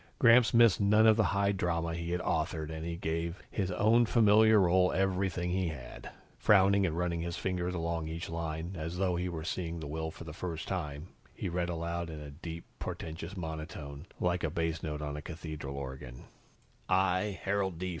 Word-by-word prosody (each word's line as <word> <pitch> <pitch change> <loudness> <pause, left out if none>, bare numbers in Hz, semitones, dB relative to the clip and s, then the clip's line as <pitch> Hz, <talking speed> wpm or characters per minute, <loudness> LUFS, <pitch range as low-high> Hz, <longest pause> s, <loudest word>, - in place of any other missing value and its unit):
Gramps 120 -2 +6
missed 115 -4 +5
none 105 +2 +5
of 110 -1 +7
the 110 -1 +3
high 100 0 +2
drama 85 -3 -1
he 85 0 -4
had 90 +1 -1
authored 80 -1 -1
and 80 0 -5
he 85 0 -3
gave 85 +2 -3
his 95 -3 -1
own 110 +5 +4
familiar 110 -1 +6
role 90 0 +4
everything 95 -2 0
he 95 0 0
had. 70 -7 -7 0.3
Frowning 100 +4 +5
and 80 0 -3
running 85 -1 -1
his 85 +1 -3
finger 90 -2 -1
along 85 -2 -2
each 80 +2 -5
line, 80 +2 -4
as 85 +1 -4
though 90 -1 +1
he 90 +1 -1
were 80 -2 -5
seeing 85 -1 -3
the 80 - -6
will 80 +2 -3
for 80 - -10
the 80 -2 -8
first 85 -1 -5
time, 75 -3 -4 0.3
he - - -3
read 90 0 -1
aloud 85 0 -3
in 80 -1 -7
a 75 -1 -8
deep 85 +2 -8
portentous 80 +4 -6
monotone, 80 -2 -6
like 90 0 0
a 80 - +1
bass 80 0 -2
note 75 -1 -4
on 75 -1 -3
a 75 - -5
cathedral 75 -4 -6
organ. 65 -3 -7 0.7
"I, 95 +1 +2
Harold 95 -3 0
D. 90 +2 -3
85 Hz, 195 wpm, -31 LUFS, 80-95 Hz, 0.7 s, of